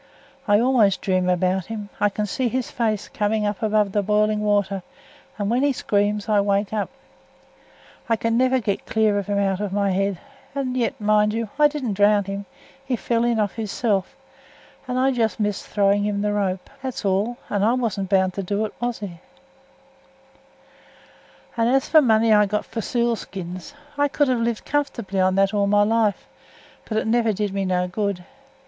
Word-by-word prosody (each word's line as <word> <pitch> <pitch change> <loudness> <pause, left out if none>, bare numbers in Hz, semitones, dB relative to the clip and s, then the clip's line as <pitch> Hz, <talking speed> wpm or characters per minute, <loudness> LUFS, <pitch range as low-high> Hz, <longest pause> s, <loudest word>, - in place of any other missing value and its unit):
I 205 0 +5
always 230 -5 +3
dream 185 -2 0
about 185 0 +1
him. 210 -2 -6
I 205 - +3
can 210 +1 -2
see 250 +5 -1
his 255 +1 -3
face 220 -3 -1
come 210 0 -1
up 205 -1 -2
above 210 -2 +2
the 205 - +1
boiling 210 +1 +1
water, 205 -2 +1 0.6
and 205 -2 -2
when 240 +4 +1
he 285 0 +2
screams 205 -2 0
I 210 -2 +3
wake 200 0 0
up. 210 -2 -1 1.2
I 230 - +4
can 230 +1 -1
never 255 +2 +3
get 205 -4 -3
clear 215 -2 +2
of 200 - -6
him 205 -1 0
out 195 -1 +1
of 205 -2 -3
my 200 0 +1
head; 195 0 0 0.4
and 260 -2 -2
yet, 250 +1 -1
mind 210 0 +2
you, 230 -2 -2
I 300 - +7
didn't 285 -7 -3
drown 205 +1 +4
him; 195 0 -6 0.4
he 265 -2 -1
fell 235 0 0
in 235 -2 +1
of 205 -2 +1
his 220 -3 -5
self, 200 -6 -1 0.7
and 250 0 -2
I 265 +1 +3
just 230 -3 0
missed 210 -2 -2
throwing 200 0 +2
him 205 0 -1
th' 210 0 0
rope, 190 -3 -1
that's 260 -5 -5
all; 200 +5 0
and 205 -1 -1
I 225 +3 +3
wasn't 210 -7 -2
bound 190 -1 +2
to 195 - -3
do 200 +3 -1
it, 215 - -7
was 240 -3 -2
I? 175 -4 -7 2.3
"As 245 +3 +2
for 315 - +6
the - - +5
money 225 -3 +4
I 210 -1 +5
got 210 +1 -2
for - - -24
the - - 0
seal 235 +1 0
skins, 185 +4 -8 0.2
I 290 - +4
could 285 0 +1
have 250 -2 +1
lived 230 -1 -2
comfortably 235 -9 -2
on 185 0 +2
it 195 +1 +3
all 200 -1 +2
my 205 0 +4
life, 220 -1 +1 0.6
but 215 - -3
it - - 0
never 225 0 +2
did 205 -1 -2
me 195 -1 -1
no 180 -1 0
good. 195 -1 -3
210 Hz, 195 wpm, -23 LUFS, 200-230 Hz, 2.3 s, I